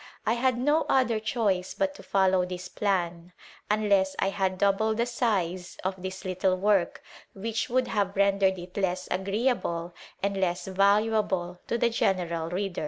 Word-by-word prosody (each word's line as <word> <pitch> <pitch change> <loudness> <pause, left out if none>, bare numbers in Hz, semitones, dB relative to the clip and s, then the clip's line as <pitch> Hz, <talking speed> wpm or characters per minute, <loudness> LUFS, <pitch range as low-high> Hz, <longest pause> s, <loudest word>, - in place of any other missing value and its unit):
I 220 - +3
had 250 +1 +1
no 295 +6 +2
other 245 -4 +3
choice 210 -5 -1
but 290 -1 0
to - - -12
follow 190 -2 +2
this 180 0 -5
plan, 175 -3 -2 0.4
unless 200 -3 +2
I 195 - +1
had 190 -1 -1
doubled 205 +3 +2
the 235 - +2
size 190 -8 -1
of 190 0 -3
this 190 +1 -6
little 185 0 +1
work, 195 -2 +1 0.3
which 225 +4 -3
would 255 +1 +1
have 200 -2 0
rendered 195 -1 +3
it 180 0 -10
less 185 -2 -1
agreeable 190 -3 -1 0.3
and 200 0 0
less 180 -1 0
valuable 195 -2 +1
to 235 - 0
the 235 0 +2
general 170 -6 0
reader. 190 +1 -3
195 Hz, 160 wpm, -27 LUFS, 185-220 Hz, 0.4 s, I